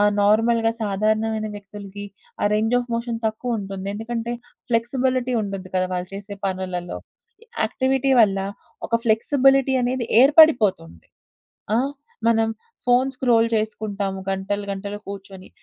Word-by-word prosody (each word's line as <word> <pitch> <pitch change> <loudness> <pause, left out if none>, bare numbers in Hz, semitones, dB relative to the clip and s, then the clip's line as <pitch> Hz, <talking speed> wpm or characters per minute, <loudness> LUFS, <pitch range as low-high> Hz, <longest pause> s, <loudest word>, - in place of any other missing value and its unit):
ఆహ్, 205 0 +5
నార్మల్‌గా 225 +2 +3
సాధారణమైన 215 +1 0
వ్యక్తులకి 205 0 -9 0.4
ఆ - - +4
రేంజ్ 225 +3 +1
ఆఫ్ 245 0 -4
మోషన్ 235 0 -2
తక్కువుంటుంది. 215 -4 -3
ఎందుకంటే, 230 +2 -4 0.4
ఫ్లెక్సిబులిటీ 255 +2 0
ఉండద్దు 195 -2 -6
కదా! 185 0 +2
వాళ్ళు 180 0 -3
చేసే 200 +1 -7
పనులలో. 185 -2 -3 0.7
యాక్టివిటీ 265 +1 0
వల్ల, 195 -3 +4 0.5
ఒక 230 - -2
ఫ్లెక్సిబులిటీ 270 +4 +3
అనేది 245 -1 -1
ఏర్పడిపోతుంది. 245 - +4 0.7
ఆ! - - +3 0.5
మనం 225 -1 +3 0.4
ఫోన్స్ 255 +2 +2
స్క్రోల్ 230 -3 +3
చేసుకుంటాము 205 -3 -2
గంటలు 195 +1 -2
గంటలు 200 +1 -5
కూర్చొని. 195 -1 -9
220 Hz, 115 wpm, -22 LUFS, 195-240 Hz, 0.7 s, ఆహ్